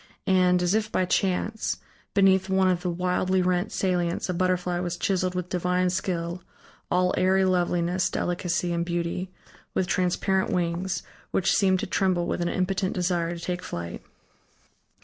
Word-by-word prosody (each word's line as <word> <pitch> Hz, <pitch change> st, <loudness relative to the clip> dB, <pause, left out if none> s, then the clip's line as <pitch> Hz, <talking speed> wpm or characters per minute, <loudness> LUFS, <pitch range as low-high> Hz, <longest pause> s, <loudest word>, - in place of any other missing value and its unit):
And, 180 Hz, -2 st, +3 dB
as 175 Hz, +2 st, +2 dB
if 215 Hz, 0 st, 0 dB
by 185 Hz, -, +1 dB
chance, 195 Hz, +4 st, 0 dB, 0.4 s
beneath 190 Hz, -1 st, +4 dB
one 190 Hz, 0 st, +3 dB
of 180 Hz, -1 st, +1 dB
the 180 Hz, -, -1 dB
wildly 180 Hz, +1 st, 0 dB
rent 180 Hz, +3 st, 0 dB
salients 180 Hz, -2 st, 0 dB
a -, -, +1 dB
butterfly 180 Hz, 0 st, 0 dB
was 175 Hz, -1 st, -3 dB
chiseled 185 Hz, -3 st, 0 dB
with 180 Hz, -1 st, -3 dB
divine 180 Hz, 0 st, +1 dB
skill, 175 Hz, -1 st, -2 dB, 0.5 s
all 180 Hz, 0 st, +2 dB
airy 190 Hz, +1 st, +3 dB
loveliness, 175 Hz, 0 st, +1 dB
delicacy, 175 Hz, 0 st, -1 dB
and 170 Hz, 0 st, 0 dB
beauty, 175 Hz, +1 st, -2 dB, 0.5 s
with 185 Hz, -, +2 dB
transparent 190 Hz, +1 st, +1 dB
wings, 175 Hz, +1 st, -1 dB, 0.3 s
which 190 Hz, -, +1 dB
seemed 190 Hz, -2 st, +3 dB
to -, -, -2 dB
tremble 185 Hz, -2 st, +1 dB
with -, -, -2 dB
an 175 Hz, -, 0 dB
impotent 185 Hz, 0 st, 0 dB
desire 175 Hz, -2 st, 0 dB
to 170 Hz, -, -10 dB
take 180 Hz, 0 st, -2 dB
flight. 85 Hz, 0 st, -6 dB
180 Hz, 155 wpm, -26 LUFS, 175-190 Hz, 0.5 s, beneath